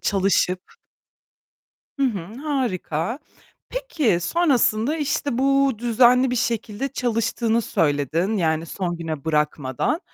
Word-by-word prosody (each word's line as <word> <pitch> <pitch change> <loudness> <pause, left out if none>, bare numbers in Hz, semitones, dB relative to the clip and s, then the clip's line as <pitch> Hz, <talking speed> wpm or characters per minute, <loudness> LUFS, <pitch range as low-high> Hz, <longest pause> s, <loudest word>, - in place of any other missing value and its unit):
çalışıp. 190 -2 +1 1.4
Hı - - 0
hı, 200 -3 -4
harika. 235 - -2 0.5
Peki, 305 - 0
sonrasında, 275 - +2
işte 285 -4 -1
bu 275 0 +3
düzenli 245 +2 +4
bir 250 - -1
şekilde 230 +1 -2
çalıştığını 230 -2 0
söyledin 165 - 0
yani 160 -3 0
son 175 0 -3
güne 160 -3 -5
bırakmadan. 150 - 0
225 Hz, 100 wpm, -23 LUFS, 170-265 Hz, 1.4 s, düzenli